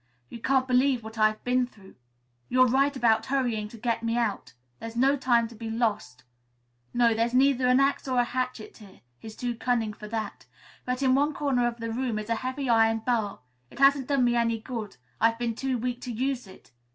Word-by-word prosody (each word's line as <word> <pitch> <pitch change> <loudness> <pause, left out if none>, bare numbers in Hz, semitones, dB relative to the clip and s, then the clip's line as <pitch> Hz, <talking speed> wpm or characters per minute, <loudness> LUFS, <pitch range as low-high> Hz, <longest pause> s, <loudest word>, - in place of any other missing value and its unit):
"You 235 - -9
can't 260 +2 +1
believe 255 -1 +2
what 220 0 -9
I've 215 0 +2
been 250 0 +1
through. 200 -5 -18 0.6
You're 255 0 +5
right 275 +3 +2
about 225 -3 +2
hurrying 245 -6 -1
to 230 - -12
get 230 0 -1
me 230 +1 -1
out. 225 - -2 0.3
There's 230 0 -7
no 270 +4 +3
time 240 -4 +2
to - - -12
be 225 0 -7
lost. 220 - -2 0.7
No, 240 -1 +3
there's 230 +2 0
neither 260 -1 +3
an 250 +1 +4
axe 275 0 +1
or 255 -1 0
a - - +4
hatchet 250 -2 -4
here. 200 -4 -16 0.2
He's 220 -1 -10
too 245 -1 -3
cunning 230 -2 -1
for 210 0 -10
that. 215 - -5 0.4
But 250 +2 -2
in 260 -1 +4
one 285 +2 +2
corner 260 -4 +1
of 235 -1 -4
the 230 0 -4
room 240 -1 -2
is 215 +2 -5
a - - +3
heavy 260 +2 -3
iron 225 -1 +3
bar. 225 -5 -1 0.3
It - - -15
hasn't 275 -1 +4
done 275 -3 +2
me 240 0 +2
any 230 -1 +1
good. 220 - -6 0.2
I've 230 0 +3
been 235 -1 -2
too 260 +2 -2
weak 245 +1 -3
to 250 - -5
use 255 0 -2
it. 190 - -16
240 Hz, 210 wpm, -27 LUFS, 225-255 Hz, 0.7 s, You're